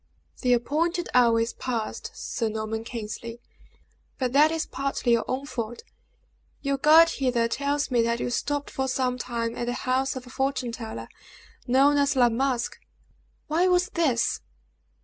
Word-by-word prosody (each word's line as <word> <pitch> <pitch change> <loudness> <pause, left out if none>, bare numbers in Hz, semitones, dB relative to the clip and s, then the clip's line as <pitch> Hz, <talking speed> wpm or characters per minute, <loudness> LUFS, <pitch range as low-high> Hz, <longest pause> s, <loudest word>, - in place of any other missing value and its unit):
"The 250 -2 +3
appointed 325 +8 0
hour 235 -2 +5
is 230 +1 -1
passed, 235 -4 -4
Sir 225 -2 -2
Norman 220 +1 -3
Kingsley, 230 0 -6 0.8
but 255 -2 -1
that 300 +3 +6
is 325 -1 -1
partly 275 -2 -2
your 235 -1 +3
own 265 +2 -2
fault. 240 -3 -5 0.8
Your 275 -1 0
guide 320 +3 +7
hither 250 -5 +1
tells 280 +3 -1
me 240 -2 +3
that 235 0 0
you 245 - -2
stopped 290 +3 -2
for 265 0 -2
some 255 -1 -1
time 230 -2 -3
at 240 - -3
the 245 - 0
house 260 +1 +1
of 260 -1 -7
a 250 - -12
fortune 265 -3 -1
teller, 220 - -7 0.6
known 275 +4 +4
as 285 0 +2
La 245 -2 +5
Masque. 245 +1 -1 0.7
Why 335 +4 +2
was 360 0 +3
this!" 270 -9 +1
255 Hz, 160 wpm, -26 LUFS, 235-280 Hz, 0.8 s, guide